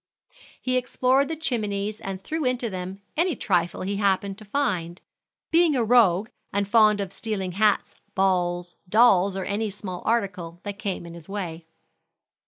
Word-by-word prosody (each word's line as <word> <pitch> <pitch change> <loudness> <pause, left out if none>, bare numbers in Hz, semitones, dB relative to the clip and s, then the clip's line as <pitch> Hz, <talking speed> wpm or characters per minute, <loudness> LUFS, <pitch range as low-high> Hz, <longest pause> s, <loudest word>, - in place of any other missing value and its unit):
He 255 0 0
explored 255 +2 +2
the 325 - -3
chimneys 215 -8 -2
and 195 -1 -5
threw 315 +8 -2
into 250 -3 0
them 185 +2 -6
any 335 0 +1
trifle 175 -5 0
he 200 +1 -2
happened 200 0 0
to 215 - -12
find, 195 -8 -1 0.5
being 330 -2 +4
a 245 - +2
rogue, 220 -3 +4 0.2
and 200 0 0
fond 215 -1 +5
of 195 -1 -4
stealing 195 -3 -3
hats, 205 +3 +2 0.2
balls, 175 -2 0
dolls, 200 -3 +5
or 190 - -3
any 210 +2 -1
small 190 -2 -6
article 185 -7 -1
that 205 -1 -6
came 195 -5 -3
in 170 - -9
his 170 +1 -12
way. 170 -5 -5
200 Hz, 160 wpm, -25 LUFS, 185-230 Hz, 0.5 s, fond